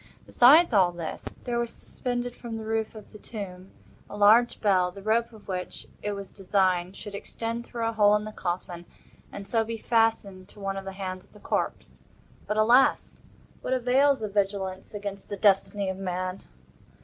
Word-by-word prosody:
Besides 290 +5 +6
all 185 -4 +5
this, 170 -2 -6
there 240 -1 -1
was 235 -1 -2
suspended 245 -1 -4
from 230 -2 -6
the 220 - -7
roof 220 0 -2
of 215 - -12
the 210 - -12
tomb, 190 -4 -8 0.4
a 205 - -7
large 220 +4 +5
bell, 185 -4 +3
the 195 +1 -11
rope 230 +3 +1
of 215 -2 -16
which, 185 -2 -5 0.2
it 205 - -2
was 200 -1 -7
designed, 185 -2 0
should 205 - -8
extend 230 +3 -5
through 230 -1 -3
a - - 0
hole 210 -1 +5
in 210 - 0
the 215 - -6
coffin, 175 -2 -4 0.5
and 200 -1 -8
so 225 -1 +2
be 225 +1 -5
fastened 220 -5 0
to - - -14
one 195 -1 -3
of 195 0 -6
the 195 - -6
hands 185 -1 -5
of - - -28
the 210 - -15
corpse. - - -3 0.5
But, 210 +1 -1
alas? 240 +5 +4 0.4
what 260 - -1
avails 260 +2 +3
the 215 - -1
vigilance 195 -1 -2
against 200 -1 -6
the 205 - -4
Destiny 200 0 +2
of 190 0 -3
man? 185 0 -3
205 Hz, 185 wpm, -27 LUFS, 190-225 Hz, 0.5 s, Besides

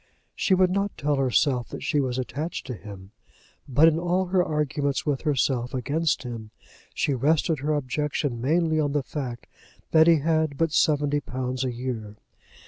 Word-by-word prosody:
She 190 - +2
would 185 -1 +3
not 200 +1 -1
tell 145 0 0
herself 130 -1 +1
that - - -7
she 150 - +1
was 130 -2 -1
attached 145 +6 -4
to 130 - -5
him; 100 -2 -10 0.6
but 145 +5 +5
in 165 0 +3
all 180 +2 +1
her 180 -1 +3
arguments 150 -3 -1
with 145 -3 0
herself 135 -4 0
against 145 +5 0
him, 115 -4 -7 0.5
she 145 - +1
rested 150 +4 +1
her 150 +2 0
objection 145 -2 -2
mainly 160 +3 +2
on 145 -2 0
the 145 -2 0
fact 130 -4 -5 0.5
that 160 0 +6
he 165 -1 +6
had 155 -2 +1
but 165 0 +1
seventy 145 -1 +2
pounds 130 -2 -3
a 130 - -1
year. 115 -4 -5
145 Hz, 170 wpm, -25 LUFS, 125-160 Hz, 0.6 s, that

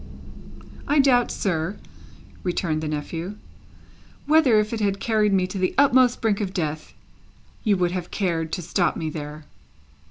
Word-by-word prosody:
"I 295 - +2
doubt, 255 -4 +4
sir," 175 0 -2 0.6
returned 170 -3 -1
the 155 - -3
nephew, 165 +5 -4 0.9
"whether, 295 -8 +5
if 210 +2 -1
it 225 - -2
had 200 -2 0
carried 215 -2 +1
me 190 -2 +2
to 190 +1 -5
the 185 - 0
utmost 260 -3 +4
brink 220 -3 +1
of 195 -2 -4
death, 155 -3 -3 0.7
you 205 -4 +2
would 175 -1 +1
have 180 -1 -4
cared 165 -5 -1
to 180 - -3
stop 175 0 0
me 160 -1 -3
there." 150 0 -7
190 Hz, 155 wpm, -23 LUFS, 165-220 Hz, 0.9 s, whether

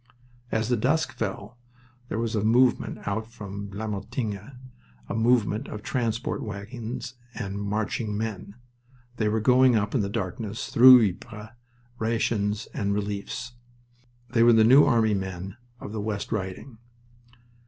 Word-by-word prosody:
As 110 +1 0
the 125 - +2
dusk 160 +8 +1
fell 110 +2 -5 0.5
there - - -2
was 115 -1 -1
a 105 - 0
movement 120 +1 +2
out 110 +2 -2
from 100 -3 -7
Vlamertinghe, 105 +3 -5 0.5
a - - -4
movement 115 +1 +2
of 105 0 -7
transport 115 -1 -2
wagons 110 +4 -6 0.2
and 100 -3 -4
marching 105 +1 -2
men. 105 -2 -5 0.6
They 110 -1 +1
were 110 +1 +1
going 125 +2 +5
up 105 -1 0
in 125 - +2
the 100 - -2
darkness 105 +1 -4
through 125 -2 +9
Ypres 105 +3 -8 0.5
rations 110 -2 0
and 100 -1 -1
reliefs. 105 +4 -4 0.8
They 115 - +2
were 120 0 +7
the 110 -1 +6
New 130 +6 +7
Army 115 -5 +3
men 95 0 -4 0.2
of 105 - -8
the 110 -1 -4
West 105 -1 -4
Riding. 110 +3 -5
110 Hz, 140 wpm, -26 LUFS, 100-115 Hz, 0.8 s, through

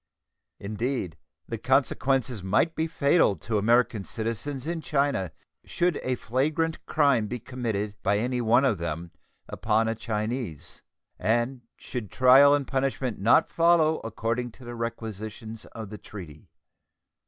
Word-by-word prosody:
Indeed, 105 - -3 0.3
the - - -4
consequences 130 -5 +1
might 105 - +2
be 160 0 -1
fatal 145 - +3
to 105 +6 -2
American 115 0 +2
citizens 115 +6 -4
in 165 0 -3
China 140 - 0 0.3
should 175 -3 0
a 130 - -1
flagrant 150 +7 -1
crime 140 -8 +3
be 125 - -3
committed 110 -4 -3
by 100 +1 +2
any 125 +3 -1
one 120 +4 +4
of 110 -9 +1
them 85 0 -4 0.4
upon 110 0 +1
a 115 - +1
Chinese, 110 - -4 0.4
and 120 +5 0 0.2
should 120 -6 -6
trial 135 +3 +7
and 145 -1 -1
punishment 135 -3 -1
not 115 +10 +5
follow 165 -2 +3
according 115 +2 -2
to 130 - -15
the 120 - -6
requisitions 110 -1 -6
of 110 -3 -9
the 105 - -7
treaty. 80 -8 -11
120 Hz, 135 wpm, -27 LUFS, 105-135 Hz, 0.4 s, trial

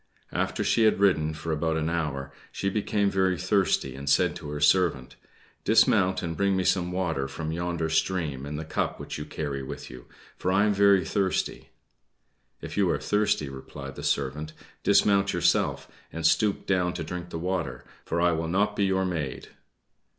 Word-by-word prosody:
After - - -1
she 115 - +3
had 110 - +3
ridden 80 -6 +2
for 80 +1 -4
about 80 +1 0
an 80 0 -1
hour 75 -5 -2 0.2
she 100 - -2
became 100 -1 0
very 95 -1 +2
thirsty, 95 +2 +1
and 70 +1 -5
said 70 - +3
to 75 - -8
her 75 0 -4
servant, 75 -5 +2 0.5
"Dismount, 95 0 +3
and 85 -1 -3
bring 100 +2 +1
me 95 - +1
some 90 -1 +1
water 85 -7 -1
from 80 +4 -5
yonder 85 -1 -2
stream 80 -4 -1
in 75 - -5
the 80 +1 -5
cup 80 - -2
which - - -6
you 75 - -5
carry 70 -3 -4
with 65 - -7
you, 60 -1 -11 0.3
for 90 - 0
I 100 +2 +4
am 105 - +2
very 100 -1 +4
thirsty." 95 -2 -1 0.9
"If - - -7
you - - +3
are - - +2
thirsty," 105 -8 +1
replied 70 +1 -9
the - - -7
servant, 75 +3 -2 0.3
"dismount 100 -1 +3
yourself, 85 0 +1 0.2
and 80 -1 -4
stoop 100 +5 +2
down 90 -2 +1
to 85 - -3
drink 90 +2 -6
the 85 - -5
water, 80 -7 -3 0.2
for 85 - -2
I 90 0 +4
will 80 0 -1
not 105 +4 +1
be 100 - +2
your 95 0 +1
maid!" 80 -7 -4
85 Hz, 185 wpm, -27 LUFS, 75-95 Hz, 0.9 s, I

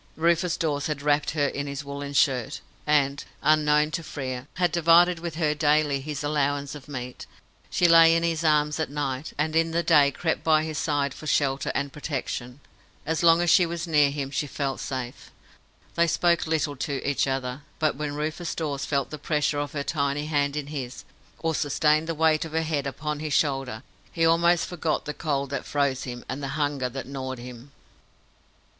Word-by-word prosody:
Rufus 170 +1 +1
Dawes 145 -3 -1
had 150 -2 -3
wrapped 145 0 +2
her 145 - +3
in 140 0 -3
his 140 0 -5
woollen 140 0 -6
shirt, 135 0 +1 0.3
and, 140 -2 +2 0.2
unknown 150 0 +3
to 165 - -2
Frere, 130 -5 -5
had 180 -2 +1
divided 170 +1 +5
with 170 -1 -5
her 155 -2 +1
daily 150 -2 +2
his 145 0 -5
allowance 145 -1 0
of 145 -3 -10
meat. 125 -3 -7 0.4
She 175 - +3
lay 165 -1 +7
in 165 - +1
his 165 -1 0
arms 150 -1 +2
at 160 - -1
night, 140 0 -3
and 155 +2 -1
in 165 0 +3
the 170 +1 0
day 150 -5 +5
crept 160 +4 -2
by 155 -1 +4
his 155 -2 -3
side 145 -3 0
for 155 - -9
shelter 140 -2 +1
and 140 -1 -2
protection. 135 -3 -5 0.4
As 160 +1 -1
long 170 0 +6
as 175 -1 +3
she 180 - +5
was 170 +1 -4
near 150 -4 +4
him 140 -1 -4
she 145 +1 -1
felt 140 -1 -3
safe. 130 -2 -5 0.6
They 170 0 +3
spoke 170 0 +2
little 155 -2 0
to 140 0 -3
each 140 -1 +1
other, 135 0 -3 0.2
but 155 -2 +1
when 145 0 -4
Rufus 155 +3 -3
Dawes 145 -4 -3
felt 140 -2 -1
the 150 - -6
pressure 150 -1 0
of 145 0 -4
her 140 -2 -2
tiny 140 -1 -1
hand 145 -2 0
in 150 -2 -3
his, 130 -4 -5 0.3
or 165 -1 -1
sustained 150 +2 +2
the 165 - -2
weight 155 0 +3
of 160 -1 -8
her 160 0 +1
head 150 -3 -1
upon 150 +2 -4
his 155 -1 -3
shoulder, 135 -7 0 0.3
he 165 -1 +1
almost 170 +1 +4
forgot 165 -3 -2
the 150 - -3
cold 140 -3 -2
that 140 - -2
froze 140 -2 -1
him, 120 -1 -7
and 135 +2 -5
the 140 +2 -4
hunger 145 -4 -1
that 135 +2 -6
gnawed 130 -1 -5
him. 125 +2 -10
150 Hz, 195 wpm, -26 LUFS, 140-160 Hz, 0.6 s, lay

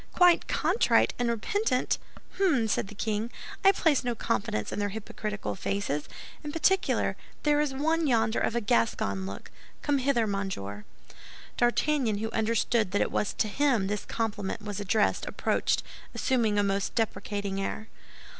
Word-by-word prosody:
"Quite 355 -1 +5
contrite - - +3
and 240 -1 +1
repentant! 255 - 0 0.4
Hem!" 295 - +3
said 205 - 0
the 210 - -11
king. 215 +2 -1 0.3
"I 390 - +8
place 320 -8 +2
no 240 -1 -1
confidence 105 - -1
in - - -3
their 205 0 0
hypocritical 210 0 -4
faces. 190 -6 -2 0.3
In 295 - -4
particular, 370 +5 +2 0.3
there 295 0 +3
is 300 -2 0
one 315 +4 +1
yonder 225 -3 +2
of 230 - 0
a 235 - +1
Gascon 100 - +1
look. 100 - -8 0.3
Come 290 -2 +2
hither, 255 -3 +2
monsieur." 190 - -4 0.7
D'Artagnan, 240 -2 +2
who 220 +2 -3
understood 225 -2 +1
that 205 - +2
it - - -4
was 210 - 0
to 220 - 0
him 245 -2 +2
this 205 +1 -2
compliment 215 -2 -3
was 205 -1 -4
addressed, 205 +2 +1
approached, - - 0 0.3
assuming 230 -6 +1
a 205 - +4
most 195 0 -1
deprecating 205 -3 -2
air. 215 +2 -4
220 Hz, 155 wpm, -28 LUFS, 200-265 Hz, 0.7 s, I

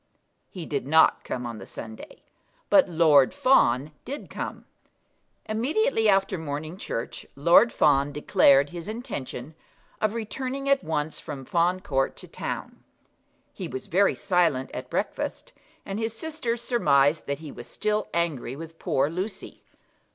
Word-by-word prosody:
He 180 -4 -7
did 140 -3 -3
not 160 +2 +5
come 125 -1 -4
on 115 -2 -6
the - - -9
Sunday, 110 -1 -10 0.5
but 290 -8 +6
Lord 155 -5 +5
Fawn 145 - +3
did 280 +4 -7
come. - - -6 0.8
Immediately 240 - +1
after 195 -2 +2
morning 155 +2 -5
church 115 -10 -5
Lord 170 +11 +5
Fawn 145 -1 +3
declared 140 -1 +4
his 175 +1 -7
intention 155 - -6 0.5
of 215 +1 +1
returning 260 +5 -4
at 275 0 +3
once 155 -1 -2
from 140 -4 -7
Fawn 175 +4 +1
Court 135 -8 0
to - - -9
town. - - -6 0.7
He - - -5
was 130 - -6
very 195 +4 +3
silent 170 -9 +1
at - - -6
breakfast, - - -3 0.3
and 195 +2 -4
his 225 0 -3
sisters 245 -6 -3
surmised 145 - +3
that 140 0 -1
he 155 -1 -9
was 120 - -10
still 215 0 -1
angry 155 -7 -1
with 165 +2 -10
poor 135 - +1
Lucy. 185 +6 -6
165 Hz, 145 wpm, -26 LUFS, 140-215 Hz, 0.8 s, but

